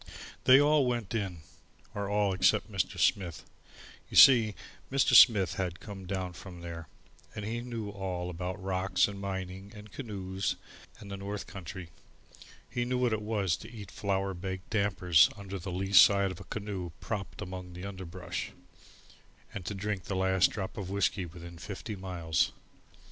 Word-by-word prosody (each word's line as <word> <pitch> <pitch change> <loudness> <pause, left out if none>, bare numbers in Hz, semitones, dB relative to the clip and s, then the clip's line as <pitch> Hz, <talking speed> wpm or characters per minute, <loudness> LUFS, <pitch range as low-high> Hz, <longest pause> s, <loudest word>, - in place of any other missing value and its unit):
They 130 +1 +9
all 145 -2 +4
went 120 -5 -2
in 95 -7 -3 0.5
or 100 -1 -3
all 105 -1 +2
except 95 - +2
Mr. - - -1
Smith. 85 -6 +1 0.6
You - - -2
see, 115 -6 +8 0.4
Mr. 135 0 +3
Smith 100 -7 +8
had 90 -1 -2
come 95 -3 -9
down 95 -1 -3
from 90 0 -10
there, 85 -1 -7 0.5
and 105 - -5
he 115 +2 -3
knew 115 -4 -5
all 90 -3 -4
about 90 +3 -4
rocks 95 0 +1
and 100 -1 -7
mining 95 0 -5
and 105 -1 -11
canoes 95 -5 -3 0.4
and 100 -2 -11
the 100 - -4
north 100 +1 -5
country. 95 -2 -8 0.8
He 120 - -2
knew 125 +1 -1
what 125 -2 +2
it 110 - -1
was 105 -5 0
to 110 - -11
eat 105 -5 -9
flour 95 -1 -1
baked 95 +1 -6
dampers 95 -7 +4
under 100 -1 -6
the 90 +2 -6
lee 95 +2 -3
side 100 0 +7
of 90 - -9
a 95 - -10
canoe 100 -4 -4
propped 100 -3 -5
among 90 0 -6
the 90 +2 -7
underbrush, 95 -2 -6 1.0
and 100 - -5
to 100 - -3
drink 100 -2 -3
the 95 - -3
last 95 -1 +3
drop 95 -3 -5
of 95 -3 -4
whiskey 100 -1 0
within 85 0 -10
fifty 105 +3 -6
miles. 90 -4 -1
95 Hz, 165 wpm, -30 LUFS, 90-105 Hz, 1.0 s, They